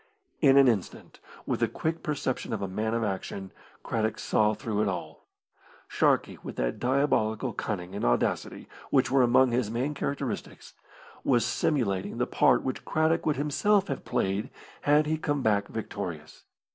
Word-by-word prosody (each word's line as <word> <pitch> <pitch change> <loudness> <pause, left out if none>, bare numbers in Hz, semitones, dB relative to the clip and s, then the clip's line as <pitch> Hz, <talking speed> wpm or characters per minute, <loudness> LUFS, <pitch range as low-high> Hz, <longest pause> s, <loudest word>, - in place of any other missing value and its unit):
In 140 -3 +5
an 135 -1 +7
instant, 110 -7 -2 0.3
with - - -1
the - - +2
quick 160 +1 -3
perception 135 -5 -2
of 105 - -3
a - - -1
man 110 +4 -2
of 115 - 0
action, 95 -1 -4 0.3
Craddock 110 -1 -1
saw 105 0 +2
through 105 0 -2
it 105 - +1
all. 95 -2 -5 0.6
Sharkey, - - +1
with - - -7
that - - -2
diabolical 125 -4 +1
cunning 90 -3 -4
and 100 - -4
audacity - - 0 0.2
which - - +2
were 135 0 +5
among 125 +1 +4
his 120 -3 0
main 125 +6 -1
characteristics, 140 -3 -4 0.5
was 120 -3 +3
simulating 105 -11 0
the - - +1
part - - +3
which 130 - -3
Craddock 160 +1 +1
would 150 - +2
himself 190 +8 +1
have - - -3
played 105 -4 -1 0.3
had 150 +1 +4
he 155 +1 -1
come 145 -3 -1
back 100 -2 +2
victorious. 95 -8 -6
120 Hz, 160 wpm, -28 LUFS, 105-140 Hz, 0.6 s, an